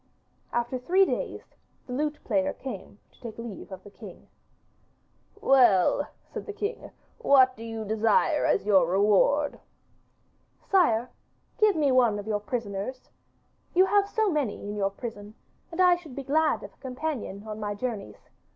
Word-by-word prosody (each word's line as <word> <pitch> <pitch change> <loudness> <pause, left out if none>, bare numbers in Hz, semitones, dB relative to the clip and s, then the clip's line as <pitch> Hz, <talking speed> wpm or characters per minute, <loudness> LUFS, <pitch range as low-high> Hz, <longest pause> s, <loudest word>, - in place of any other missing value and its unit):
After 240 +2 -1
three 370 +9 +4
days - - -4 0.3
the 250 - -7
lute 300 +3 -1
player 285 0 0
came 210 -7 -8
to - - -27
take 230 -3 -8
leave 230 -4 -8
of 190 0 -9
the 205 - -13
king. - - -13 1.1
'Well,' 245 - +4 0.2
said - - -8
the 420 - -5
king, 415 +3 -4 0.3
'what 260 -2 +5
do 225 - -10
you 225 -1 -5
desire 220 - +2
as - - +1
your 190 -5 +4
reward?' 210 - +2 1.0
'Sire, 250 - +2 0.5
give 425 -3 +4
me 295 -4 +2
one 240 -5 +4
of 205 - -6
your 215 -1 -1
prisoners. 210 +2 -5 0.6
You 370 +2 +6
have 405 0 +2
so 435 -3 +1
many 280 -10 -2
in 205 - -4
your 195 -1 0
prison, 205 0 -8 0.4
and 335 - -7
I 360 -1 +6
should 315 -7 -12
be 275 - -5
glad 305 +3 +1
of - - -10
a - - -30
companion 255 -6 -5
on 215 0 -6
my 205 -1 -3
journeys. 205 - -6
250 Hz, 160 wpm, -27 LUFS, 210-300 Hz, 1.1 s, You